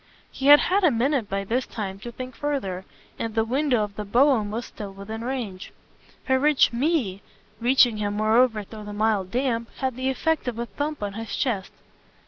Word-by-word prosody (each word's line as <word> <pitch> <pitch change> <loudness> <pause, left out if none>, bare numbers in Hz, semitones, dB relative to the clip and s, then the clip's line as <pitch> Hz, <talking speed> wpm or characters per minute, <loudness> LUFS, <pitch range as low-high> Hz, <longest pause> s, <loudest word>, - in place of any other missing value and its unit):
He 270 - -2
had 290 +1 +9
had 390 +2 +1
a 350 - +7
minute 250 -2 0
by 195 0 -1
this 240 +6 -1
time 195 -3 -5
to 235 +3 -7
think 255 +1 -8
further, 195 -11 -3 0.3
and 225 -1 -3
the 225 0 +2
window 255 -1 +1
of 205 -1 -6
the 210 - -3
brougham 235 0 +3
was 230 +3 -4
still 205 -2 -8
within 210 +4 -7
range. 235 -7 -4 0.5
Her 260 0 +2
rich 295 -3 +4
"me," 240 - 0 0.4
reaching 245 -2 +4
him 205 -1 -2
moreover 220 +1 +3
through 215 +1 -10
the 205 - -7
mild 205 -3 +1
damp, 235 0 -1
had 260 -2 -2
the 260 +1 -1
effect 315 +3 0
of 240 -2 -2
a 235 - -2
thump 290 +4 -4
on 200 -1 -3
his 225 0 -5
chest. 215 -8 -1
230 Hz, 195 wpm, -25 LUFS, 210-265 Hz, 0.5 s, had